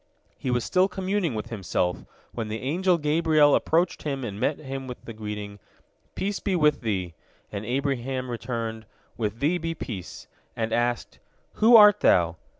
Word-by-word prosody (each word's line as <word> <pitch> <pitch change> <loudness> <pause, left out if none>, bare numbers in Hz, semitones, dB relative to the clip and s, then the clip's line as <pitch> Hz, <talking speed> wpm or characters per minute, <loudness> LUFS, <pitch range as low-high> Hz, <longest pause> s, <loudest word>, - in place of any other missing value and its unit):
" - - -45
He 130 - -3
was 125 -1 +1
still 185 +1 +3
communing 190 - -1
with 110 +2 -5
himself 90 -4 -2 0.3
when 115 -2 -4
the 110 +1 -4
angel 175 +6 +2
Gabriel 155 -1 +3
approached 175 +3 +1
him 140 -3 -3
and 105 -4 -5
met 145 - 0
him 135 -2 -6
with 125 - -9
the 115 - -7
greeting, 105 -1 -6 0.6
"Peace 200 +1 -2
be 195 - -1
with 150 -3 +3
thee," 95 -7 -2 0.4
and 100 0 -5
Abraham 130 -1 -2
returned, 115 -2 -4 0.3
"With 110 0 -3
thee 165 +5 +2
be 165 0 -3
peace," 100 - -7 0.3
and 110 -1 -2
asked, 120 0 -1 0.4
"Who 230 +2 +8
art 210 -2 +8
thou?" 85 -1 +3
130 Hz, 165 wpm, -26 LUFS, 110-165 Hz, 0.6 s, Who